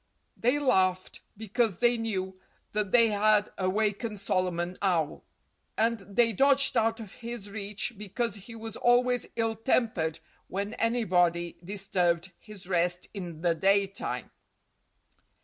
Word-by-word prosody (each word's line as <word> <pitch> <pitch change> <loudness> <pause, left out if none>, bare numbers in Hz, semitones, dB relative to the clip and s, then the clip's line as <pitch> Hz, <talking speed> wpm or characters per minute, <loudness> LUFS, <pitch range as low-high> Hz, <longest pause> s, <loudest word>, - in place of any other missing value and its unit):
They 250 +5 +2
laughed 185 -10 +1 0.2
because 220 -2 0
they 240 +3 +3
knew 190 -5 -3 0.3
that 210 -2 -1
they 230 -2 +6
had 210 0 +3
awakened 210 +3 0
Solomon 180 -2 -1
Owl. 170 -6 0 0.5
And 230 +1 +2
they 220 +4 +1
dodged 275 +5 +4
out 225 0 +2
of 215 -4 -9
his 230 -4 -7
reach 210 +3 -3
because 210 +3 -3
he 210 +3 -8
was 225 -1 -7
always 245 +1 +3
ill 225 -1 0
tempered 220 -9 0 0.3
when 200 +3 -3
anybody 180 -8 +1
disturbed 180 -2 0
his 210 -4 -12
rest 180 -1 0
in 175 -6 -7
the 170 -1 +3
daytime. 195 +3 0
205 Hz, 125 wpm, -28 LUFS, 185-230 Hz, 0.5 s, they